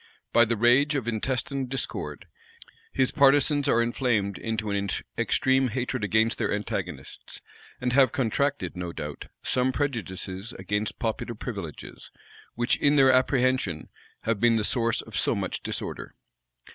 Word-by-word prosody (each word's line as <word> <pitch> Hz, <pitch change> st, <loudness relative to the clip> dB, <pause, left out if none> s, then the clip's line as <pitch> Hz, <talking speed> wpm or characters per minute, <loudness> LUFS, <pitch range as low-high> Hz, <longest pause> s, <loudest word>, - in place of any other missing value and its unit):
By 115 Hz, -, +6 dB
the 115 Hz, 0 st, -1 dB
rage 130 Hz, +7 st, +4 dB
of 130 Hz, -5 st, -2 dB
intestine 130 Hz, +3 st, -1 dB
discord, 130 Hz, 0 st, -4 dB, 0.7 s
his 130 Hz, -1 st, +2 dB
partisans 145 Hz, 0 st, +4 dB
are 115 Hz, -4 st, +4 dB
inflamed 115 Hz, -5 st, 0 dB
into 110 Hz, -2 st, -2 dB
an 100 Hz, 0 st, -1 dB, 0.3 s
extreme 130 Hz, 0 st, +2 dB
hatred 125 Hz, 0 st, -3 dB
against 110 Hz, +3 st, +2 dB
their -, -, 0 dB
antagonists; 105 Hz, 0 st, -5 dB, 0.4 s
and 125 Hz, -1 st, -1 dB
have 130 Hz, -3 st, +5 dB
contracted, 140 Hz, +2 st, -1 dB
no 90 Hz, -1 st, -5 dB
doubt, 75 Hz, -1 st, -6 dB, 0.2 s
some 130 Hz, 0 st, +1 dB
prejudices 105 Hz, -, -3 dB
against 105 Hz, +3 st, -3 dB
popular 115 Hz, +1 st, -3 dB
privileges, 100 Hz, -, -7 dB, 0.5 s
which, 120 Hz, +1 st, +1 dB
in 145 Hz, 0 st, +3 dB
their 135 Hz, -2 st, +6 dB
apprehension, 130 Hz, -, +1 dB, 0.3 s
have 115 Hz, -2 st, -1 dB
been 120 Hz, +1 st, +4 dB
the 110 Hz, -, +1 dB
source 115 Hz, +1 st, +1 dB
of -, -, -11 dB
so -, -, +1 dB
much -, -, -3 dB
disorder. -, -, -5 dB
120 Hz, 140 wpm, -26 LUFS, 105-130 Hz, 0.7 s, By